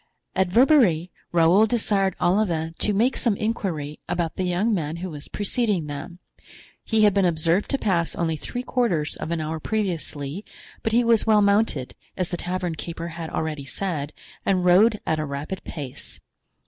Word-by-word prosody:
At 190 0 +2
Verberie, 205 - +4 0.2
Raoul 175 +6 +5
desired 205 -5 +1
Olivain 175 -4 +1
to 210 - +2
make 225 +6 +2
some 230 -4 +1
inquiry 170 -9 -3
about 170 -2 -1
the 185 - -1
young 185 +6 +1
man 160 -5 -2
who 180 +1 -5
was 145 -2 -9
preceding 205 -4 0
them; 150 +5 -7 0.7
he 220 -1 +2
had 205 -2 +5
been 200 0 +3
observed 170 +2 +2
to 275 - +1
pass 180 -9 0
only 165 -2 0
three 245 +10 -5
quarters 200 -14 0
of - - -5
an 170 -1 -1
hour 155 +1 -3
previously, 175 -5 -3 0.4
but 225 - -1
he 240 +2 +4
was 230 -1 +3
well 210 -1 +5
mounted, 200 - +1 0.2
as 180 -1 -1
the 175 - -3
tavern 180 0 -2
keeper 170 +1 -6
had 165 -1 -6
already 155 -3 -3
said, 150 -1 -3 0.3
and 185 -2 +1
rode 210 +5 +5
at 160 -1 0
a 155 - -1
rapid 145 +7 -5
pace. 140 -5 -7
180 Hz, 175 wpm, -24 LUFS, 160-210 Hz, 0.7 s, Raoul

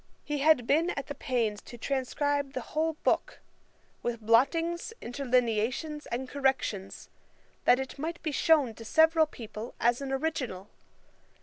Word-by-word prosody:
He 295 -1 -2
had 285 -4 +4
been 320 +7 +3
at 280 -5 -3
the 285 - -5
pains 235 -7 -1
to 240 - -11
transcribe 280 +2 -1
the 255 - -3
whole 320 +1 +1
book, - - +1 0.6
with 240 -1 -2
blottings, 330 - +2
interlineations, 250 +3 -1
and 255 +2 -3
corrections, 260 -8 -1 0.6
that 250 - +6
it 265 +1 -6
might 330 +4 -3
be 310 - -1
shewn 290 -5 +3
to 225 - -11
several 320 +7 +4
people 225 -3 -8
as 240 +3 +2
an 275 -1 -4
original. 265 -9 -3
270 Hz, 140 wpm, -29 LUFS, 235-305 Hz, 0.6 s, that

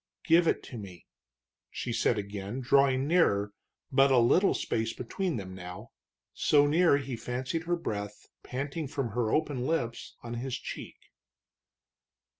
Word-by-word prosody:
"Give 165 +1 +5
it - - +1
to 120 - -8
me!" 95 -4 -10 0.6
she 120 - -4
said 115 0 +2
again, 100 +3 -4
drawing 135 0 +3
nearer, 105 - +2 0.4
but 135 +1 +5
a 130 - +4
little 125 +12 +4
space 115 0 -1
between 170 +6 -3
them 95 -3 -6
now, 90 -1 -9 0.4
so 145 -1 +4
near 160 0 +4
he 135 -3 -4
fancied 130 +8 -3
her 175 +1 +1
breath, 105 -10 -5 0.2
panting 140 +4 -4
from 135 -3 -3
her 110 0 -1
open 145 -5 0
lips, 120 -8 -2
on 120 0 -6
his 130 -1 -3
cheek. - - -8
130 Hz, 145 wpm, -29 LUFS, 110-145 Hz, 0.6 s, Give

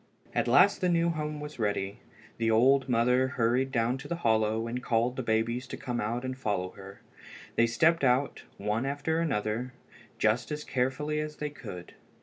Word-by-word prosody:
At - - 0
last 180 +13 +5
the 180 - +2
new 170 0 +2
home 150 -1 -4
was 150 -2 -8
ready. 100 -2 -1 0.4
The 115 -1 +1
old 130 +4 +4
mother 125 +2 +3
hurried 130 +2 +1
down 120 +1 0
to - - -8
the 170 - -2
hollow 110 -5 +1
and 120 +2 -4
called 120 +1 +1
the 130 - -2
babies 115 +2 0
to - - -6
come 120 -2 -3
out 120 +4 -2
and 130 0 -3
follow 100 -7 -2
her. 100 0 -12 0.5
They 115 - +4
stepped 160 +7 +3
out, 130 +2 +2 0.2
one 105 +5 -1
after 145 +3 -1
another, 125 -4 -1 0.4
just 115 +5 +1
as 150 0 -3
carefully 135 +4 -1
as 150 0 -4
they 150 -1 -4
could. 105 -12 -9
125 Hz, 180 wpm, -29 LUFS, 115-145 Hz, 0.5 s, last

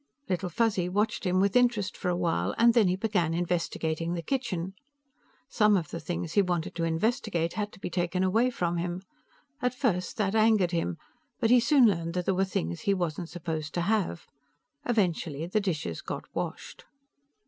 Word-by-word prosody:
Little 185 0 -1
Fuzzy 190 -2 +1
watched 210 +1 0
him 180 +1 +2
with 200 +2 +2
interest 235 -6 +2
for 180 - -2
a 175 - +1
while, 105 - 0
and 235 0 +6
then 225 -5 +5
he 180 - +2
began 185 -5 0
investigating 165 -1 -1
the 170 - -4
kitchen. 190 -9 -2 0.7
Some 210 -5 +4
of 165 -5 -4
the 170 - -4
things 170 -2 -4
he 205 - +5
wanted 175 -3 -1
to 170 - -3
investigate 170 0 0
had 210 -1 -3
to - - -14
be 180 - -5
taken 180 +1 0
away 225 +7 +3
from 175 -7 -1
him; 175 +2 -3 0.6
at 250 0 0
first 200 -9 -1
that 200 -2 0
angered 215 -5 +4
him, 125 - -1 0.4
but 225 - +2
he 250 - +7
soon 255 +2 +5
learned 170 -5 +1
that 180 -1 -1
there 195 - +2
were 190 +1 +2
things 85 - -3
he 200 - +2
wasn't 175 -2 -3
supposed 160 -3 -4
to 175 - +1
have. 190 -2 0 0.6
Eventually, 170 -9 0
the 200 +5 0
dishes 170 -6 -3
got - - -5
washed. - - -5
180 Hz, 185 wpm, -28 LUFS, 170-215 Hz, 0.7 s, he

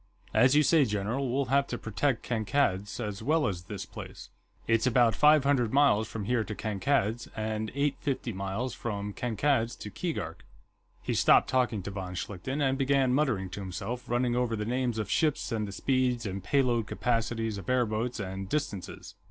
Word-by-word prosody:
"As 130 +3 +5
you 150 - +6
say, 155 +1 +5
general, 115 +4 -1
we'll 135 +2 +1
have 140 0 +3
to 120 - -3
protect 115 +3 -1
Kankad's, 110 -3 0
as 105 -3 -4
well 150 +5 +2
as 90 -3 -3
this 100 -1 -6
place. - - -10 0.4
It's 115 +2 +3
about 120 -2 +4
five 150 -1 +5
hundred 135 -5 +2
miles 135 -6 +4
from 110 -3 -5
here 120 0 +1
to 105 - -6
Kankad's, 110 +2 0
and 110 0 -2
eight 140 0 +1
fifty 130 -4 -2
miles 100 +6 -3
from 105 -3 -4
Kankad's 120 +1 0
to 105 - -8
Keegark...." 120 - -4 0.6
He - - -1
stopped - - +4
talking 120 -6 +1
to 100 - -5
von 95 -2 -5
Schlichten, 130 +11 -2
and 135 +1 0
began 135 -2 +2
muttering 120 -10 0
to 100 - -6
himself, 115 +7 -5
running 120 0 +1
over 120 -2 0
the 105 -1 -3
names 125 0 -1
of 110 - -2
ships, 155 -5 +1
and 110 -2 -1
the - - -6
speeds 125 +1 0
and 95 -1 -4
pay 140 +5 +3
load 120 -3 0
capacities 115 -3 -1
of 95 - -8
airboats, 120 -1 0
and 95 -1 -5
distances. 105 -11 -4
115 Hz, 185 wpm, -29 LUFS, 105-130 Hz, 0.6 s, you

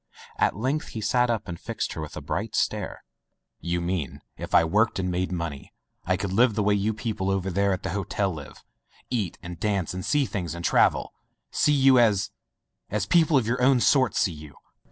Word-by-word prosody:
At - - +2
length 135 +7 -1
he 110 - -6
sat 125 +3 +2
up 110 -3 -1
and 85 -2 -6
fixed - - -4
her 80 - -5
with 75 - -7
a - - -5
bright - - -3
stare. - - -1 0.6
"You 85 0 -2
mean 85 -4 -3
if - - -3
I - - +7
worked 105 +7 +2
and 90 -1 -1
made 90 +1 -1
money, 85 -6 -5 0.3
I 95 +1 +1
could 100 -1 -3
live 115 +1 +4
the 105 - +1
way 105 +1 +3
you 100 +2 +1
people 110 -3 -3
over 95 -1 -1
there 100 +2 +1
at 95 - -2
the - - -3
hotel 100 0 -1
live; 75 -3 -10 0.5
eat 105 -9 -1
and 85 -1 -8
dance 100 -6 -1
and 90 0 -5
see 145 -2 +2
things 90 - -4
and 85 0 -6
travel - - +2 0.2
— - - -52
see 150 - +3
you 135 -2 +5
as 105 -5 +3 0.3
— - - -54
as 105 -1 -1
people 160 +3 +4
of 125 - +1
yourown 125 +2 +3
sort 130 -3 +3
see 90 - +1
you?" 75 -2 -12
100 Hz, 215 wpm, -26 LUFS, 90-115 Hz, 0.6 s, I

